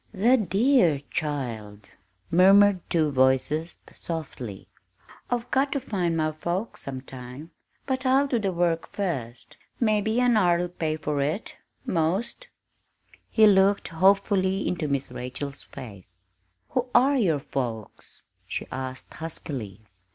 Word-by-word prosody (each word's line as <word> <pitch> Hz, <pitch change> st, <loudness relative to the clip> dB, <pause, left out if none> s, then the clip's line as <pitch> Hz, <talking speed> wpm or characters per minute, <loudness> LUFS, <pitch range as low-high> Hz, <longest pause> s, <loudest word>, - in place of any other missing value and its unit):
"The 230 Hz, +7 st, +4 dB
dear 200 Hz, -, +3 dB
child!" 115 Hz, -9 st, -4 dB, 0.4 s
murmured 195 Hz, +3 st, +6 dB
two 155 Hz, -3 st, +2 dB
voices 135 Hz, +5 st, +1 dB, 0.2 s
softly. 130 Hz, -, -6 dB, 0.6 s
"I've 245 Hz, 0 st, -2 dB
got 270 Hz, +1 st, +2 dB
to 280 Hz, -, 0 dB
find 180 Hz, -9 st, -1 dB
my 155 Hz, -1 st, +1 dB
folks, 175 Hz, +7 st, -4 dB
sometime, 130 Hz, +2 st, -8 dB, 0.3 s
but 260 Hz, -1 st, -2 dB
I'll 265 Hz, +2 st, +4 dB
do 255 Hz, -4 st, 0 dB
the 195 Hz, -3 st, -1 dB
work 170 Hz, -2 st, 0 dB
first. 130 Hz, -, -4 dB, 0.2 s
Mebbe 215 Hz, -3 st, +2 dB
an 245 Hz, -2 st, +4 dB
hour'll 175 Hz, -3 st, +2 dB
pay 160 Hz, -3 st, -2 dB
for 150 Hz, -2 st, -2 dB
it 155 Hz, +10 st, -3 dB, 0.3 s
'most!" 185 Hz, -, -1 dB, 0.8 s
He 220 Hz, -, +5 dB
looked 200 Hz, 0 st, +4 dB
hopefully 190 Hz, +2 st, +2 dB
into 170 Hz, -4 st, -1 dB
Miss 140 Hz, -2 st, -2 dB
Rachel's 125 Hz, +3 st, -6 dB
face. 100 Hz, -6 st, -11 dB, 0.5 s
"Who 250 Hz, 0 st, -1 dB
are 275 Hz, +3 st, +5 dB
your 170 Hz, -9 st, +2 dB
folks?" 120 Hz, -6 st, -6 dB, 0.2 s
she -, -, -4 dB
asked 130 Hz, 0 st, -6 dB
huskily. 130 Hz, -, -6 dB
165 Hz, 120 wpm, -26 LUFS, 135-205 Hz, 0.8 s, murmured